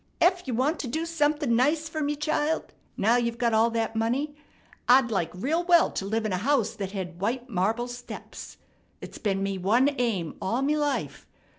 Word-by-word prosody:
Ef 360 Hz, -2 st, +3 dB
you 250 Hz, -, -1 dB
want 280 Hz, +7 st, +1 dB
to 270 Hz, -, -3 dB
do 315 Hz, +7 st, -2 dB
somethin' 295 Hz, -5 st, +1 dB
nice 300 Hz, +6 st, +2 dB
fer 315 Hz, -1 st, -4 dB
me, 295 Hz, 0 st, 0 dB
child, 305 Hz, +1 st, -1 dB, 0.2 s
now 230 Hz, +4 st, +3 dB
you've 235 Hz, -1 st, -1 dB
got 235 Hz, -1 st, +1 dB
all 225 Hz, +1 st, +4 dB
that 225 Hz, -1 st, -2 dB
money, 255 Hz, +7 st, -1 dB, 0.5 s
I'd 250 Hz, -1 st, +6 dB
like 185 Hz, -6 st, 0 dB
real 300 Hz, -, 0 dB
well 345 Hz, -1 st, +5 dB
to 195 Hz, -, -4 dB
live 220 Hz, +2 st, -1 dB
in 210 Hz, -, -1 dB
a -, -, +1 dB
house 240 Hz, +1 st, +1 dB
that 200 Hz, -4 st, -5 dB
hed 180 Hz, -3 st, -6 dB
white 245 Hz, +5 st, -2 dB
marble 220 Hz, +6 st, 0 dB
steps. 245 Hz, 0 st, -9 dB, 0.4 s
It's -, -, -9 dB
been 195 Hz, -2 st, 0 dB
me 195 Hz, -1 st, -2 dB
one 235 Hz, +10 st, +3 dB
aim 200 Hz, -10 st, -1 dB
all 235 Hz, +7 st, 0 dB
me 295 Hz, +2 st, +2 dB
life. 295 Hz, -2 st, -2 dB
245 Hz, 195 wpm, -27 LUFS, 220-295 Hz, 0.5 s, I'd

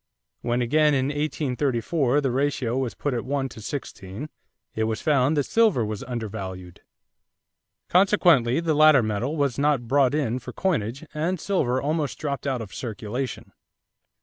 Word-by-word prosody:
When 120 Hz, +1 st, 0 dB
again 150 Hz, +4 st, +3 dB
in 135 Hz, 0 st, +1 dB
1834 145 Hz, -1 st, 0 dB
the 135 Hz, -3 st, 0 dB
ratio 130 Hz, -2 st, 0 dB
was 130 Hz, -3 st, -2 dB
put 145 Hz, -, -2 dB
at 120 Hz, -, -2 dB
one 135 Hz, 0 st, -1 dB
to 110 Hz, -, -11 dB
sixteen, 110 Hz, 0 st, -6 dB, 0.4 s
it 110 Hz, -, 0 dB
was 110 Hz, 0 st, -2 dB
found 145 Hz, 0 st, +2 dB
that 145 Hz, -, +3 dB
silver 215 Hz, -, +2 dB
was 105 Hz, -1 st, -4 dB
undervalued. 95 Hz, -7 st, -6 dB, 1.1 s
Consequently 175 Hz, -, +4 dB
the 165 Hz, -2 st, 0 dB
latter 155 Hz, -4 st, +6 dB
metal 110 Hz, +8 st, -2 dB
was 140 Hz, -3 st, 0 dB
not 145 Hz, -5 st, +1 dB
brought 135 Hz, +1 st, +3 dB
in 130 Hz, -5 st, 0 dB
for -, -, -9 dB
coinage 135 Hz, -, -1 dB
and 165 Hz, +4 st, -1 dB
silver 130 Hz, -10 st, 0 dB
almost 145 Hz, -3 st, -1 dB
dropped 140 Hz, -2 st, -3 dB
out 130 Hz, -4 st, -1 dB
of 105 Hz, -, -12 dB
circulation. 120 Hz, +2 st, -5 dB
135 Hz, 150 wpm, -25 LUFS, 120-150 Hz, 1.1 s, latter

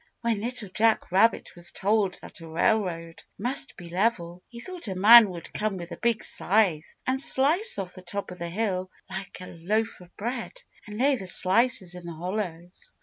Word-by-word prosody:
When 230 Hz, -3 st, 0 dB
Little 235 Hz, -3 st, -2 dB
Jack 220 Hz, +1 st, +1 dB
Rabbit 210 Hz, +5 st, +2 dB
was 175 Hz, 0 st, -5 dB
told 200 Hz, -2 st, +1 dB
that -, -, -11 dB
a 165 Hz, -, -10 dB
railroad 165 Hz, -2 st, -1 dB, 0.2 s
must 260 Hz, +6 st, -1 dB
be 175 Hz, -, -9 dB
level, 180 Hz, -2 st, -1 dB
he 235 Hz, -, -10 dB
thought 360 Hz, +2 st, -5 dB
a 190 Hz, -, -3 dB
man 215 Hz, +3 st, +9 dB
would 175 Hz, -3 st, -9 dB
come 210 Hz, -2 st, -2 dB
with 175 Hz, 0 st, -8 dB
a -, -, -6 dB
big 235 Hz, -2 st, 0 dB
scythe 185 Hz, -6 st, +1 dB
and 265 Hz, +1 st, 0 dB
slice 320 Hz, -, +3 dB
off 185 Hz, -2 st, -5 dB
the 185 Hz, -, -11 dB
top 190 Hz, +2 st, -5 dB
of 180 Hz, -, -10 dB
the 170 Hz, 0 st, -4 dB
hill 185 Hz, -1 st, -2 dB, 0.2 s
like 190 Hz, 0 st, -6 dB
a -, -, -7 dB
loaf 210 Hz, +6 st, -2 dB
of 180 Hz, 0 st, -17 dB
bread 235 Hz, +3 st, -4 dB, 0.3 s
and 210 Hz, 0 st, -8 dB
lay 270 Hz, +3 st, +3 dB
the 190 Hz, -, -6 dB
slices 190 Hz, 0 st, +2 dB
in 180 Hz, -1 st, -10 dB
the 170 Hz, -, -6 dB
hollows. 180 Hz, -, -5 dB
195 Hz, 195 wpm, -26 LUFS, 180-230 Hz, 0.3 s, man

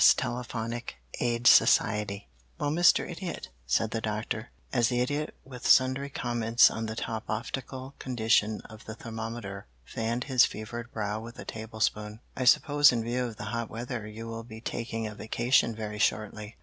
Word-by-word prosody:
TELEPHONIC 120 Hz, -, -4 dB, 0.2 s
AID 120 Hz, 0 st, 0 dB
SOCIETY 105 Hz, -4 st, +4 dB, 0.3 s
"Well, 145 Hz, -, -1 dB
Mr. 175 Hz, +3 st, +4 dB
Idiot," 175 Hz, 0 st, -6 dB, 0.2 s
said 110 Hz, -, +1 dB
the 115 Hz, -, -2 dB
Doctor, 110 Hz, +2 st, -3 dB, 0.2 s
as 120 Hz, -3 st, +3 dB
the 125 Hz, -1 st, 0 dB
Idiot 145 Hz, +5 st, -1 dB
with 125 Hz, -2 st, -6 dB
sundry 130 Hz, +2 st, +4 dB
comments 120 Hz, -3 st, +3 dB
on 110 Hz, 0 st, -3 dB
the 110 Hz, -, -4 dB
top 110 Hz, -1 st, -4 dB
loftical 130 Hz, +4 st, -4 dB
condition 110 Hz, -4 st, +1 dB
of 110 Hz, -1 st, -13 dB
the 110 Hz, -, -7 dB
thermometer 110 Hz, -, -6 dB, 0.2 s
fanned 115 Hz, -, -2 dB
his 130 Hz, -3 st, +4 dB
fevered 115 Hz, +3 st, -4 dB
brow 105 Hz, -1 st, -2 dB
with 115 Hz, +2 st, -10 dB
a -, -, -8 dB
tablespoon, 110 Hz, -1 st, -2 dB, 0.2 s
"I 130 Hz, -, -2 dB
suppose 145 Hz, +3 st, +6 dB
in 115 Hz, -2 st, -1 dB
view 125 Hz, +2 st, -1 dB
of 115 Hz, -3 st, -6 dB
the -, -, -6 dB
hot 115 Hz, -1 st, -2 dB
weather 120 Hz, -1 st, -5 dB
you 110 Hz, +2 st, -8 dB
will 115 Hz, 0 st, -5 dB
be 110 Hz, -1 st, -10 dB
taking 115 Hz, -1 st, -4 dB
a 105 Hz, -, -5 dB
vacation 115 Hz, +2 st, +1 dB
very 105 Hz, -1 st, -5 dB
shortly." 110 Hz, 0 st, -1 dB
115 Hz, 165 wpm, -29 LUFS, 110-125 Hz, 0.3 s, suppose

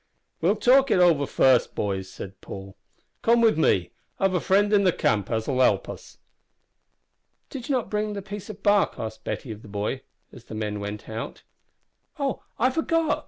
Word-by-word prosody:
"We'll 185 Hz, +6 st, +3 dB
talk 265 Hz, +5 st, +4 dB
it -, -, +3 dB
over 165 Hz, -6 st, +4 dB
first, 130 Hz, -2 st, +3 dB
boys," 95 Hz, -2 st, -2 dB
said 95 Hz, 0 st, -9 dB
Paul. 95 Hz, 0 st, -9 dB, 0.5 s
"Come 235 Hz, +1 st, +4 dB
with 230 Hz, -1 st, +4 dB
me. 95 Hz, -, +2 dB, 0.3 s
I've 195 Hz, -1 st, +2 dB
a 180 Hz, -, +2 dB
friend 205 Hz, +4 st, +2 dB
in 200 Hz, -1 st, +5 dB
the 185 Hz, -, +4 dB
camp 105 Hz, -, 0 dB
as'll 115 Hz, +3 st, -1 dB
help -, -, +3 dB
us." -, -, -10 dB, 1.3 s
"Did 260 Hz, -2 st, -7 dB
you 275 Hz, -, +2 dB
not 235 Hz, -4 st, -2 dB
bring 210 Hz, 0 st, -1 dB
the 200 Hz, -1 st, -5 dB
piece 205 Hz, 0 st, -8 dB
of 205 Hz, -1 st, -9 dB
bark?" 205 Hz, -1 st, +3 dB
asked 110 Hz, 0 st, -6 dB
Betty 125 Hz, -, -4 dB
of 105 Hz, -1 st, -8 dB
the -, -, -13 dB
boy, 100 Hz, +1 st, -3 dB, 0.3 s
as -, -, -14 dB
the -, -, -8 dB
men 105 Hz, -1 st, -3 dB
went 100 Hz, +1 st, -6 dB
out. 110 Hz, +1 st, -6 dB, 0.7 s
"Oh! 280 Hz, -2 st, -2 dB, 0.2 s
I 255 Hz, +3 st, +3 dB
forgot. 320 Hz, +1 st, +1 dB
180 Hz, 185 wpm, -25 LUFS, -, 1.3 s, in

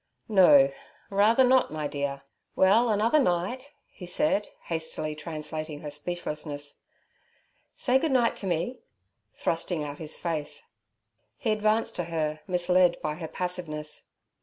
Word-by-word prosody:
'No—rather 195 Hz, -, +4 dB
not, 255 Hz, -, +4 dB
my 155 Hz, -1 st, -2 dB
dear? 140 Hz, -1 st, -3 dB, 0.3 s
Well, 220 Hz, +6 st, +4 dB
another 220 Hz, +7 st, +3 dB
night' 250 Hz, +6 st, -1 dB, 0.2 s
he 180 Hz, -, -11 dB
said, 180 Hz, +3 st, +1 dB
hastily 160 Hz, -2 st, -3 dB
translating 155 Hz, -1 st, -6 dB
her 150 Hz, -, -6 dB
speechlessness. 150 Hz, -2 st, -3 dB, 1.0 s
'Say 260 Hz, +1 st, +2 dB
good 315 Hz, +1 st, 0 dB
night 245 Hz, -3 st, +3 dB
to 195 Hz, -, -5 dB
me' 180 Hz, +9 st, -1 dB, 0.6 s
thrusting 165 Hz, -1 st, -1 dB
out 145 Hz, 0 st, -6 dB
his 155 Hz, -2 st, -4 dB
face. 160 Hz, -4 st, -4 dB, 0.7 s
He 225 Hz, -, -1 dB
advanced 215 Hz, +2 st, +1 dB
to 175 Hz, -, -1 dB
her, 155 Hz, -2 st, -2 dB
misled 180 Hz, -1 st, +3 dB
by 150 Hz, -, -1 dB
her 160 Hz, +1 st, -6 dB
passiveness. 165 Hz, -4 st, -4 dB
175 Hz, 125 wpm, -27 LUFS, 150-210 Hz, 1.0 s, No—rather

